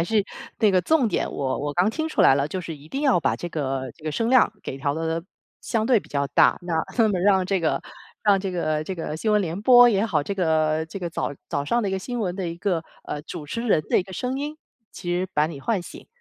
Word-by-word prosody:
还 - - +2
是 215 +3 +2 0.4
那 215 - +4
个 185 -1 +3
重 270 - +3
点， 195 - -1
我 135 -2 -2
我 145 0 -3
刚 180 +6 +2
听 315 +8 -2
出 - - -1
来 135 - +7
了， 140 0 +1
就 185 +5 -4
是 165 -2 -6
一 145 +2 -16
定 270 - -3
要 275 -9 +4
把 155 - +1
这 175 - -5
个 135 -5 -3
这 155 - -18
个 155 - -2
声 230 +6 0
量 255 -5 +5
给 - - -5
调 140 +1 -1
得 165 +2 -2 0.4
相 225 -1 -1
对 250 -2 +5
比 - - -13
较 140 -1 -1
大， 140 - +4
那 175 -2 -3 0.2
那 225 -2 +5
么 195 -3 0
让 190 0 +4
这 195 0 +1
个 165 -3 0 0.4
让 205 -2 +4
这 190 0 -3
个 155 -4 -1
这 190 - -4
个 160 -3 -4
新 215 +6 0
闻 210 - +4
联 175 +1 -3
播 245 0 +8
也 205 -2 +2
好， 170 -10 +1
这 200 +7 -4
个 160 -3 +1
这 165 - -7
个 175 -2 -3
早 165 - -3 0.2
早 145 - -1
上 235 +11 +1
的 205 - -1
一 - - -3
个 190 - 0
新 245 +5 -4
闻 185 -4 -2
的 190 -3 -3
一 170 0 -5
个， 175 -4 -1 0.2
呃， 150 - -5
主 150 -1 -8
持 230 +11 -4
人 160 -8 +3
的 - - +4
一 - - +1
个 190 +1 -12
声 255 +7 -3
音， 295 +2 -4 0.4
其 175 - -6
实 180 +1 0
把 150 +1 +2
你 155 -3 -7
唤 220 +4 0
醒。 175 - -11
180 Hz, 295 characters per minute, -24 LUFS, 155-215 Hz, 0.4 s, 播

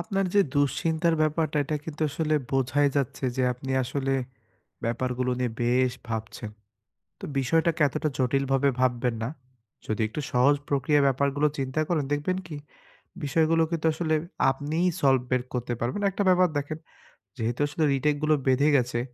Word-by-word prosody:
আপনার 195 -2 -1
যে 200 - +6
দুশ্চিন্তার 160 +4 +1
ব্যাপারটা 155 0 0
এটা 150 +2 -2
কিন্তু 160 0 -5
আসলে 155 +1 0 0.2
বোঝাই 135 +2 +2
যাচ্ছে 135 0 -1
যে 130 - +1
আপনি 130 +2 -7
আসলে, 135 +2 -2 0.7
ব্যাপার 120 +2 -1
গুলো 125 0 +1
নিয়ে 125 -2 0
বেশ 125 +1 +2 0.2
ভাবছেন। 110 0 -5 0.7
তো - - -7
বিষয়টাকে 160 +5 +1
এতটা 145 +3 -2
জটিলভাবে 135 +1 +2
ভাববেন 125 -1 +1
না। 115 - -1 0.6
যদি 110 - -2
একটু 130 - -5
সহজ 135 +4 +4
প্রক্রিয়ায় 145 +1 +2
ব্যাপারগুলো 140 +2 +1
চিন্তা 135 +2 -1
করেন 160 -5 +1
দেখবেন 150 +6 0
কি 155 -3 -7 0.7
বিষয়গুলো 165 +2 +2
কিন্তু 165 -1 -1
আসলে 160 0 -1 0.4
আপনিই 150 +6 -1
সলভ 135 -2 +4
বের 125 -1 +2
করতে 125 -1 -2
পারবেন। 120 - -2
একটা 195 - -2
ব্যাপার 185 0 +5
দেখেন 145 +2 -4 0.6
যেহেতু 115 +2 -2
আসলে 150 +2 -2
রিটেক 145 +2 +1
গুলো 155 0 +4
বেঁধে 135 +3 +4
গেছে, 125 -2 +1
140 Hz, 155 wpm, -26 LUFS, 125-155 Hz, 0.7 s, যে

